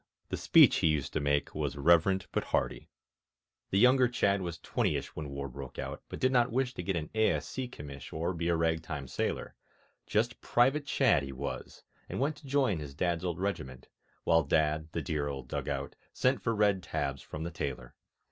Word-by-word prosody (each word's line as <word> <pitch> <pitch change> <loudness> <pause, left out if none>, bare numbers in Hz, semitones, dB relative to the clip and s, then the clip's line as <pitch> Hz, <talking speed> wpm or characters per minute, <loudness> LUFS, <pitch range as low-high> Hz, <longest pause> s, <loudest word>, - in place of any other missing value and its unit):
The - - -1
speech - - +6
he - - +3
used 75 -3 0
to - - +1
make 70 0 0
Was 75 -2 -2
reverent 85 +6 +4
but - - -1
hearty. - - -1 0.8
The 95 - +1
younger 125 +3 +6
Chadd 100 -5 +1
was 85 -2 -4
twentyish - - -1
When 75 -2 -5
War 70 0 -4
broke 65 0 -9
out, - - -5
but - - -6
did 130 - +3
not 125 -2 +3
wish 125 +1 0
To - - -5
get 95 +1 -1
an 80 -2 -3
A.S.C. 110 +3 0
commish 70 - -9
Or 85 +3 -1
be 85 -1 -2
a 85 - +3
rag 80 0 +1
time 75 -5 -5
sailor; - - -2 0.5
Just 115 +3 0
Private 135 +4 +2
Chadd 130 - +3
he 70 -1 -6
was, 70 +2 -6 0.3
and - - -3
went 145 +4 +1
To 145 - -13
join 130 - +2
his 70 -2 -8
Dad's 85 +2 0
old 90 -2 -2
regiment, 65 -10 -4 0.3
While 80 0 +4
Dad 80 0 +1
(the - - -3
dear 75 -4 -1
old 70 -3 -5
dug - - -3
out) - - -3 0.2
sent 130 -3 +2
For 115 +3 0
red 105 -3 +3
tabs 70 -5 -3
from 75 - -7
the 85 - -4
tailor. 65 -6 -5
85 Hz, 200 wpm, -31 LUFS, 70-110 Hz, 0.8 s, speech